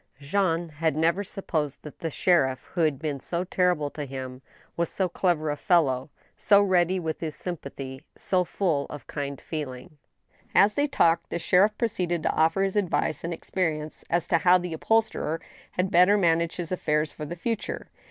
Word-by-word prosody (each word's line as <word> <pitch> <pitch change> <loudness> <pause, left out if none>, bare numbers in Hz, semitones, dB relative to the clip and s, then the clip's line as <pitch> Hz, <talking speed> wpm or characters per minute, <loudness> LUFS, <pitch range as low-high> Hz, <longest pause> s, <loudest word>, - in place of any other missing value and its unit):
Jean 165 +2 0
had 155 0 -1
never 165 +5 +2
supposed 160 -8 -3
that 150 - -10
the 165 - -2
sheriff 135 -6 +2
who 175 - 0
had 155 -4 +2
been 145 -1 -3
so 170 +6 -3
terri 180 -1 +2
ble 145 -1 -3
to 150 - -5
him 130 -1 -7 0.3
was 170 -1 0
so 190 - 0
clever 170 -4 0
a - - -1
fellow 150 -7 +2 0.2
— - - -34
so 200 -1 +5
ready 185 -2 +3
with 160 -2 -3
his 155 -2 -4
sympathy, 140 -6 -6 0.2
so 185 -1 +1
full 170 -6 -1
of 150 - -9
kind 140 -2 -5
feeeling. 145 -2 -7 0.6
As 205 +1 +6
they 290 +4 +1
talked, 170 - +2
the - - -2
sheriff 190 +5 +3
proceeded 175 -7 -1
to - - +2
offer 165 +5 +2
his 195 0 -1
advice 170 -6 0
and 170 - -3
ex 165 - -8
perience 155 -4 -1
as 170 0 +1
to 165 - +4
how 180 +3 +6
the 180 -2 -4
upholsterer 190 -3 0 0.3
had 180 +1 0
better 180 +4 +6
manage 170 -3 +2
his 175 -1 -4
affairs 150 -4 0
for 150 - -7
the 170 - -5
future. 220 +5 -4
165 Hz, 190 wpm, -26 LUFS, 150-185 Hz, 0.6 s, As